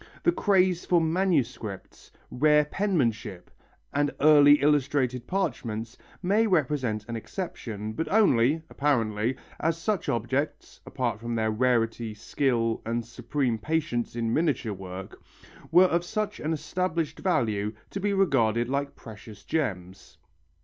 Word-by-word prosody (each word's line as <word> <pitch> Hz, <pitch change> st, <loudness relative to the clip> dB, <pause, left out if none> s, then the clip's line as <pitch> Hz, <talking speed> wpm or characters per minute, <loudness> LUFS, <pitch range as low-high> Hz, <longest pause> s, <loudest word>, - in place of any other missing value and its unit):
The 345 Hz, -, +4 dB
craze 185 Hz, -, +2 dB
for 175 Hz, -, +3 dB
manuscripts, 160 Hz, -, -2 dB, 0.2 s
rare 150 Hz, +2 st, +4 dB
penmanship, 130 Hz, -, -1 dB, 0.4 s
and 145 Hz, +1 st, +2 dB
early 145 Hz, -1 st, +7 dB
illuminated 135 Hz, -4 st, +1 dB
parchments 115 Hz, -, -3 dB, 0.3 s
may 210 Hz, +5 st, +3 dB
represent 130 Hz, -, 0 dB
an 115 Hz, -, -4 dB
exception, 110 Hz, -, -5 dB
but 160 Hz, +9 st, -3 dB
only, 160 Hz, -, +3 dB
apparently, 120 Hz, -5 st, 0 dB, 0.2 s
as 165 Hz, 0 st, 0 dB
such 200 Hz, +2 st, -2 dB
objects 130 Hz, +6 st, -2 dB
apart 120 Hz, -5 st, -2 dB
from 115 Hz, +1 st, -4 dB
their 110 Hz, -1 st, +1 dB
rarity, 115 Hz, -1 st, 0 dB
skill 115 Hz, 0 st, 0 dB
and 115 Hz, +1 st, -2 dB
supreme 120 Hz, 0 st, -2 dB
patience 130 Hz, -4 st, -2 dB
in 115 Hz, -1 st, -1 dB
miniature 145 Hz, -9 st, 0 dB
work 95 Hz, 0 st, -9 dB, 0.5 s
were 180 Hz, +3 st, +7 dB
of 170 Hz, -1 st, +1 dB
such 215 Hz, +4 st, -3 dB
an 155 Hz, -, -2 dB
established 165 Hz, 0 st, -2 dB
value 115 Hz, -, 0 dB
as 105 Hz, -, -5 dB, 0.2 s
to 195 Hz, -, -4 dB
be 205 Hz, +1 st, 0 dB
regarded 120 Hz, -, +2 dB
like 140 Hz, +1 st, -2 dB
precious 105 Hz, -1 st, -12 dB
gems. 95 Hz, -, -4 dB
130 Hz, 130 wpm, -27 LUFS, 115-160 Hz, 0.5 s, early